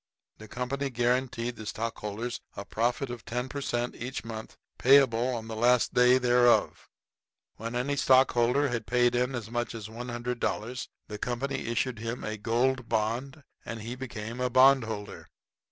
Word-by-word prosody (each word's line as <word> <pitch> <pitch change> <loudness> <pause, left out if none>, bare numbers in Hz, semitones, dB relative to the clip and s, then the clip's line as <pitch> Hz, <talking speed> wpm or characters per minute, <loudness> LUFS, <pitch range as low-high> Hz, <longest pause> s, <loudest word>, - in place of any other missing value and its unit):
The 110 - -10
company 125 +5 -3
guaranteed 120 -1 0
the 110 - -8
stockholders 115 +1 -4 0.2
a 100 - -5
profit 120 +3 -1
of 120 -1 -7
ten 125 +3 -3
per 140 +2 -5
cent. 120 -2 -1
each 125 +1 -6
month, 110 -1 -7 0.2
payable 130 -3 +5
on 110 -1 -6
the 110 - -5
last 120 +2 +3
day 125 +1 +6
thereof. 120 -1 +3 0.7
When 115 +2 -5
any 135 +4 0
stockholder 130 0 +4
had 115 -2 -3
paid 120 0 +3
in 125 +2 0
as 115 -2 -6
much 120 -1 -2
as 110 -2 -7
$100, 120 0 -3 0.2
the 105 - -6
company 130 +3 -3
issued 115 0 -1
him 115 +2 -4
a 110 - -3
Gold 120 +3 0
Bond 125 +7 -1 0.2
and 115 -2 -6
he 115 +2 -5
became 120 -2 -6
a 125 - +1
bondholder. 120 -5 +3
120 Hz, 155 wpm, -28 LUFS, 115-125 Hz, 0.7 s, day